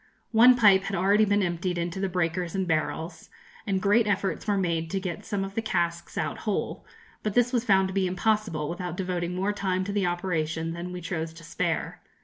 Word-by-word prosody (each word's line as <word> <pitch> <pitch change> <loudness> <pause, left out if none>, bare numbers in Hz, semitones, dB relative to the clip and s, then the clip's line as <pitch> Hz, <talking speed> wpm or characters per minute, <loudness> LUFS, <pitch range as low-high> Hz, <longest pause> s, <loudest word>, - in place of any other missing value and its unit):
One 240 +3 +7
pipe 200 -5 +5
had 195 - -2
already 200 +4 +4
been 205 0 +2
emptied 175 0 -1
into 170 +2 -3
the 195 0 -1
breakers 175 0 -1
and 190 -1 -1
barrels, 160 0 -2 0.4
and 195 -1 +1
great 210 +3 +3
efforts 200 +1 -1
were 205 -1 +2
made 165 -3 -1
to 195 - -1
get 180 -3 -5
some 205 -3 -1
of 195 0 -6
the 225 - -1
casks 170 -5 -2
out - - -2
whole; 210 -3 -3 0.3
but 210 -2 -3
this 245 +1 +3
was 240 -1 +1
found 190 -4 +4
to - - -5
be 190 -1 +1
impossible, 185 -4 0
without 175 +1 -4
devoting 180 -2 -2
more 195 +3 0
time 190 -2 -1
to 200 - -4
the 200 -3 +1
operation 165 -2 -2
than 175 +1 -6
we 180 0 -6
chose 165 -1 -4
to 165 0 -13
spare. 165 - -2
185 Hz, 210 wpm, -27 LUFS, 170-200 Hz, 0.4 s, One